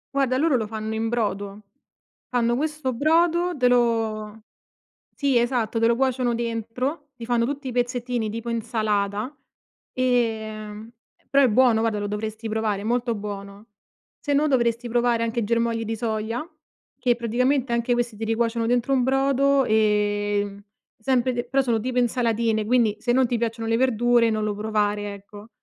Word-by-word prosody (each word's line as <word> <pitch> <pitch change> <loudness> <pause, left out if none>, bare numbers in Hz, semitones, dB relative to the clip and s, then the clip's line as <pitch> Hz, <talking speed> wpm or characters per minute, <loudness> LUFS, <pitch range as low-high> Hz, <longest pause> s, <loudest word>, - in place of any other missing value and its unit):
Guarda, 265 -2 +2
loro 300 -2 +3
lo 220 -3 -2
fanno 220 0 -4
in 225 +1 -1
brodo. 205 -3 -2 0.7
Fanno 240 -1 +1
questo 300 0 -2
brodo, 335 +6 +2
te 255 -3 +2
lo 225 -3 +1 0.7
sì 275 -3 +1
esatto, 235 -2 0
te 230 - +3
lo 235 - +3
cuociono 255 -2 +1
dentro, 235 +6 -3
ti 230 - -9
fanno 240 -1 +2
tutti 280 +1 -4
i - - -4
pezzettini 245 -2 -1
tipo 230 +2 -6
insalata, 215 +1 -1 0.6
ehm, 220 -3 -1 0.4
però 280 0 +4
è - - +5
buono 235 0 +4
guarda 225 -2 0
lo 205 - -2
dovresti 215 +2 -4
provare, 215 -2 -1
è - - -8
molto 240 +1 0
buono. 200 0 -7 0.5
Se 290 - -3
no 295 +2 +3
dovresti 240 -3 +1
provare 240 0 +1
anche 230 0 -1
germogli 230 +1 0
di 225 +1 -3
soia, 220 +2 -2 0.6
che 245 -2 +2
praticamente 245 +2 0
anche 235 +1 0
questi 240 -2 -2
te 225 - -4
li 225 - 0
cuociono 230 0 0
dentro 245 +3 +1
un 260 - +2
brodo, 270 +1 +2
ehm, 205 -1 +1 0.4
sempre 255 +2 +1
de 240 0 -2
però 270 +2 +1
sono 235 -3 +1
tipo 250 +2 -2
insalatine 230 -2 +1
quindi 225 -2 +2
se 240 +3 0
non 260 0 +3
ti 240 0 -1
piacciono 230 0 -2
le 225 - +2
verdure 240 -1 +3
non 215 -1 -1
lo 210 -1 -1
provare, 210 -1 -1
ecco. 205 +2 -13
235 Hz, 165 wpm, -24 LUFS, 220-250 Hz, 0.7 s, è